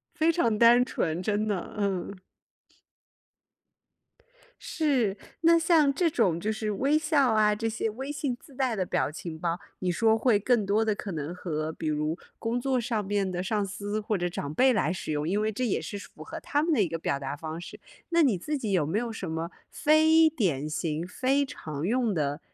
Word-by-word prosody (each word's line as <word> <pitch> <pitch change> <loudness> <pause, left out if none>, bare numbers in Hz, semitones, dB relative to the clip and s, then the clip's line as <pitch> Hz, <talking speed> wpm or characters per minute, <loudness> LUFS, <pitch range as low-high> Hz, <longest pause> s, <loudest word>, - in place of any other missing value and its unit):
非 330 0 +3
常 230 -11 +1
单 240 +1 +7
纯， 170 -7 -2
真 210 +2 0
的， 200 -4 -3
嗯。 200 -1 -2 2.4
是， 260 -11 0 0.3
那 335 +1 +6
像 320 -4 +4
这 335 +2 +2
种 180 - +1
就 215 - -1
是 215 -1 -2
微 275 +9 +2
笑 300 -5 +2
啊， 210 -1 +4
这 225 +2 -2
些 225 0 -2
微 265 +6 -6
信 285 -4 -2
自 275 - -17
带 255 -3 0
的 190 -3 -1
表 150 - 0
情 160 0 -7
包， 170 +2 -2 0.2
你 180 -1 -1
说 225 +4 +3
会 220 -4 +3
更 220 -1 +1
多 210 +3 +2
地 215 - +1
可 195 - -5
能 155 +1 -4
和 160 -3 -3
比 160 - -6
如 155 +2 -1 0.2
工 235 +2 -1
作 260 -1 +1
上 220 -3 -2
面 200 -1 0
的 180 0 -3
上 205 +1 0
司， 205 +2 -4
或 210 -2 -1
者 175 - 0
长 150 -4 -5
辈 260 +10 +4
来 185 -7 +1
使 165 -3 -4
用。 150 +1 -1
因 200 +4 +1
为 215 0 0
这 250 +5 -2
也 220 - 0
是 205 - -6
符 - - -11
合 - - -7
他 290 +1 0
们 330 - +1
的 240 -9 +3
一 175 - 0
个 165 +1 -3
表 140 -3 -1
达 135 +1 -4
方 160 +2 -6
式。 175 - -10 0.3
那 335 0 +3
你 250 -10 +3
自 295 - -3
己 215 -5 -3
有 175 -6 +3
没 170 +8 -1
有 235 -1 -3
什 190 -6 -5
么 165 +1 -3 0.2
非 315 +1 +5
典 175 - -1
型、 155 +1 -2
非 265 +8 +1
常 155 - -5
用 235 -1 +1
的 145 -3 -1
210 Hz, 225 characters per minute, -27 LUFS, 175-255 Hz, 2.4 s, 单